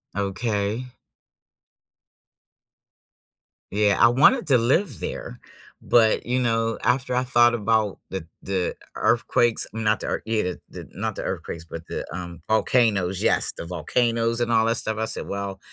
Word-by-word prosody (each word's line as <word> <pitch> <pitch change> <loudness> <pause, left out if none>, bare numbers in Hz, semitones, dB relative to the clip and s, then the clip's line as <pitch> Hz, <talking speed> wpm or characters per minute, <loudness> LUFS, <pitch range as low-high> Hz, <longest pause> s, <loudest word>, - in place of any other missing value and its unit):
Okay. 105 +3 -2 2.8
Yeah, 105 0 +2
I 110 - +8
wanted 150 - +4
to 130 -3 +5
live 130 - +1
there, 60 - -6 0.4
but, 115 -2 +3
you 125 +1 0
know, 115 -2 0
after 125 0 +1
I 125 - +2
thought 120 -1 +4
about 110 -2 0
the 95 -4 -5 0.2
the 95 -2 -2 0.2
earthquakes, 120 -2 +2
not 110 -2 0
the - - -5
ear - - -2
Yeah, 110 -1 0
the 90 -1 -4
the - - -10
not 105 +2 -3
the - - -5
earthquakes, 80 0 -5
but 85 0 -8
the, - - -4
um 85 -1 -7
Volcanoes, 110 -5 +2
yes, - - +2
the - - -6
volcanoes 115 +7 0
and 120 0 0
all 110 -1 +4
that 115 +1 +1
stuff, 110 0 -2
I 110 - -1
said, - - -4
"Well, 100 -1 -4
110 Hz, 155 wpm, -24 LUFS, 100-120 Hz, 2.8 s, I